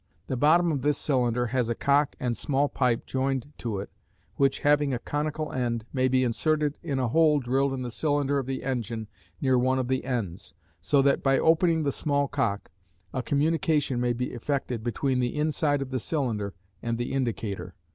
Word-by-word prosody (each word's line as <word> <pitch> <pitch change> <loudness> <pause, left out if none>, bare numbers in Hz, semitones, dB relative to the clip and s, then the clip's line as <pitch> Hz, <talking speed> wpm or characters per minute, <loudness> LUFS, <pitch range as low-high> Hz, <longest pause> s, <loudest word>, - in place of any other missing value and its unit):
The 130 - -2
bottom 160 +6 +4
of 140 -4 -1
this 145 +1 +1
cylinder 125 -3 +1
has 125 -3 +1
a 120 - 0
cock 140 +3 +2
and 120 -2 -1
small 140 +1 +1
pipe 125 -4 0
joined 135 +1 -2
to 110 -4 -3
it 95 - -6 0.4
which, 140 -1 +2
having 145 -2 +3
a - - -1
conical 150 +4 -3
end, 120 -3 -2
may 130 -1 +2
be 130 0 +2
inserted 150 +4 +1
in 145 -6 -2
a 125 -2 0
hole 155 +2 +4
drilled 135 +2 +1
in 130 -1 -3
the 120 - -4
cylinder 145 +1 +1
of 130 - -4
the 135 0 -3
engine 115 -4 -3 0.3
near 130 -3 +3
one 130 +1 +2
of 130 -1 -1
the 130 0 0
ends, 115 -9 -4 0.3
so 135 - +3
that, 140 0 +3
by 135 -1 +3
opening 165 +1 +3
the 140 - +1
small 140 0 0
cock, 115 -8 -2 0.4
a 130 - -1
communication 150 -2 +1
may 120 -1 +1
be 125 +1 -3
effected 125 -2 -2
between 125 +3 0
the 125 +3 -1
inside 150 -2 +1
of 135 - -10
the 130 - -1
cylinder 110 - -2 0.3
and 115 -1 -2
the 120 +2 -3
indicator. 115 -6 -3
135 Hz, 195 wpm, -27 LUFS, 120-145 Hz, 0.4 s, bottom